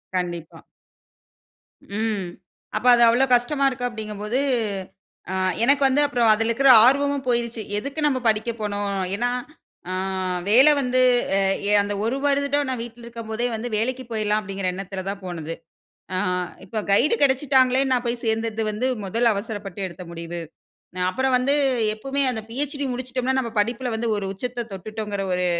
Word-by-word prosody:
கண்டிப்பா. 175 -3 -4 1.4
ம். 215 -5 -1 0.5
அப்ப 215 +3 -2
அது 240 - +4
அவ்வளோ 245 +3 +4
கஷ்டமா 275 +3 +1
இருக்க 255 -1 -6
அப்படிங்கும் 215 -3 -7
போது, 235 +5 0 0.9
அ - - -2 0.3
எனக்கு 280 +3 +3
வந்து 275 +2 +2
அப்பறம் 240 -6 +3
அதில 225 +2 0
இருக்க 270 +3 +5
ஆர்வமும் 280 +1 +2
போயிருச்சு. 235 -1 0 0.2
எதுக்கு 280 +7 -5
நம்ம 265 -3 0
படிக்க 220 +2 +1
போணும்? 205 -1 -2 0.3
ஏனா, 245 +3 0 0.6
ஆ - - -2 0.6
வேல 260 +7 +7
வந்து 255 0 +1 0.4
அ - - +3 0.4
அந்த 205 0 -3
ஒரு 245 +4 0
வருடம் 285 0 +1
நான் 255 -2 -2
வீட்ல 235 0 -11
இருக்கும் 230 -1 -8
போதே 235 +2 -1
வந்து 225 +2 -4
வேலைக்கு 255 +4 -1
போயிடலாம் 215 -1 0
அப்டிங்கிற 195 -1 -4
எண்ணத்தில 190 0 -6
தான் 200 0 -5
போனது. 165 -3 -5 0.6
ஆ - - 0 0.5
இப்ப 215 +2 -3
கைடு 290 - +4
கெடைச்சுட்டாங்கலே 265 -1 +3
நான் 245 -1 +2
போய் 235 0 -2
சேர்ந்தது 225 0 -1
வந்து 235 +5 -1 0.2
முதல 230 +4 +2
அவசரப்பட்டு 205 -2 -6
எடுத்த 180 +1 -10
முடிவு. 170 0 -6 0.6
நா - - -3
அப்புறம் 260 +5 0
வந்து 260 +3 +2 0.4
எப்போமே 270 +6 -2
அந்த 220 - -4
பிஎச்டி 285 +3 -2
முடிச்சுட்டோம்ன்னா, 255 +1 -2
நம்ம 235 - -4
படிப்புல 245 +4 -1
வந்து 230 +1 -2
ஒரு 200 -1 -3
உச்சத்த 240 +3 -4
தொட்டுட்டோங்கற 210 +1 -5
ஒரு 180 0 0
235 Hz, 155 wpm, -23 LUFS, 210-260 Hz, 1.4 s, வேல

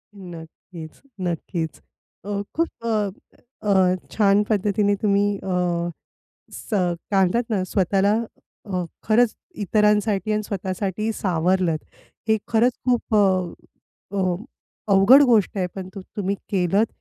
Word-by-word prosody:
नक्कीच, 170 -2 -11 0.2
नक्कीच. 170 -2 -3 0.4
अ, 200 0 -2
खूप 330 +1 +1 0.2
अ, 230 - 0 0.8
अ, 185 -2 +4 0.2
छान 205 -1 +3
पद्धतीने 205 0 +2
तुम्ही 205 -1 +3
अ, 180 -2 -1 0.6
स 220 - -6 0.4
काय 195 -1 +3
म्हणतात 235 +6 -1
ना 200 -4 +1
,स्वतःला 195 +2 +2 0.5
अ, 185 -3 -2 0.2
खरंच 225 +1 +3 0.3
इतरांसाठी 210 0 +2
आणि 215 - 0
स्वतःसाठी 195 +1 -3
सावरलत. 180 -3 +1 0.5
हे 220 - +4
खरंच 235 +2 +3
खूप 245 -2 0
अ, 190 -3 +2 0.6
अ, 185 -2 +1 0.6
अवघड 210 +9 +7
गोष्ट 210 -2 +2
आहे, 185 - +1
पण 190 -1 -6
तु 195 - -6 0.2
तुम्ही 200 -1 -1 0.2
केलत 195 +3 +2
195 Hz, 115 wpm, -23 LUFS, 180-210 Hz, 0.8 s, अवघड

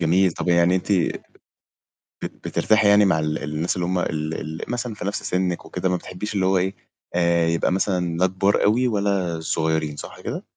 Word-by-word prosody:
جميل. 90 +2 +3
طَب - - -4
يعني 85 +1 +4
أنتِ 95 +2 -2 1.3
بت - - -5
بترتاحي 110 -1 +3
يعني 105 0 +6
مع 85 -5 +3
ال 75 0 -2
الناس 75 +3 -2
اللي 90 -2 -1
هُم 90 0 0
ال 75 -1 -2 0.3
ال - - -5
مثلًا 120 -1 -3
في 100 - -7
نفس 100 - -3
سِنِّك 90 -1 -1
وكده، 90 +1 -2
ما 90 - +1
بتحبيش 90 +4 -6
اللي 95 -2 +1
هو 95 0 +3
إيه، 95 +2 0 0.4
آآ، 85 -1 +3
يبقى 85 +2 +1
مثلًا 90 -3 0
لا 95 +1 +4
كبار 95 +2 +1
أوي، 120 +5 +3
ولا 100 -6 0
صغيّرين، 80 -2 -1
صح - - -9
كده؟ - - -5
90 Hz, 195 wpm, -23 LUFS, 85-100 Hz, 1.3 s, يعني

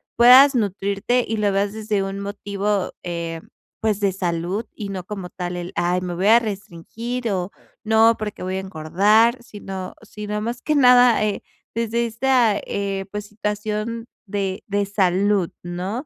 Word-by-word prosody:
puedas 255 +4 +8
nutrirte 205 +2 0
y 225 - -2
lo 205 -1 +1
veas 200 +1 0
desde 215 -2 -1
un 195 0 -4
motivo, 200 -1 -2
eh, 170 -2 -4 0.4
pues 215 -2 0
de 200 -2 +2
salud 180 +3 -2
y 205 -2 -6
no 190 -2 -5
como 190 -2 -7
tal 180 0 -5
el 175 0 -5
ay, 175 +1 +1
me 180 -1 -4
voy 185 +3 0
a 230 +2 +7
restringir 220 +3 -5
o, 185 0 -2 0.3
no, 220 +1 +5
porque 210 -3 -5
voy 185 +1 -2
a - - -1
engordar, 200 +7 +2
sino 195 -4 -7
sino 210 -1 -5
más 235 +2 -4
que 305 - 0
nada, 250 -4 +6
eh, 210 -1 -2 0.3
desde 230 +1 0
esta, 235 -2 +2
eh, 195 -1 -3
pues, 210 0 -5
situación 210 +2 -3 0.2
de 195 -1 -3
de 200 0 0
salud, 195 -1 +1
¿no? 185 - -4
205 Hz, 160 wpm, -22 LUFS, 190-225 Hz, 0.4 s, puedas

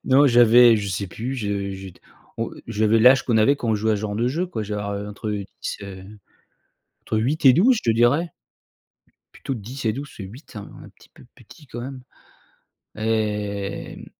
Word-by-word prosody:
Non, 140 +2 +5
j'avais 120 -1 +7
je 100 -1 -3
sais 95 +1 -3
plus, 120 +9 -5
je 100 -4 -3
je 95 0 -8
t 90 - -22 0.4
on - - -2 0.2
j'avais 110 +2 +2
l'âge 125 +2 +6
qu'on 115 - +1
avait 110 +6 +4
quand 120 - -4
on 110 - +3
jouait 110 +1 +1
à - - +1
ce - - -5
genre 105 -1 -3
de 120 +3 0
jeu, 170 +7 -1
quoi, 170 -12 -4
je 105 - -6
devais 105 - -3
avoir 100 0 -4
entre 105 +1 -5
10, 100 -1 -5
heu, 95 -1 -9 1.0
entre - - -3
8 140 +8 -1
et 130 - +9
12, 240 +7 +4
je - - -7
te - - +2
dirais 135 +9 +2 1.0
plutôt 135 - -5
10 120 +4 -7
et 110 - +2
12, 140 +4 -6
parce - - -16
que 100 - -6
8, 120 +11 -11
c'est 110 - -9
un 100 - -10
un - - -13
petit - - -22
peu - - -18
petit 150 -4 -17
quand 120 0 -7
même, 130 0 -7 1.0
et 105 -2 -2
mmh, - - -11
110 Hz, 220 wpm, -23 LUFS, 105-130 Hz, 1.0 s, et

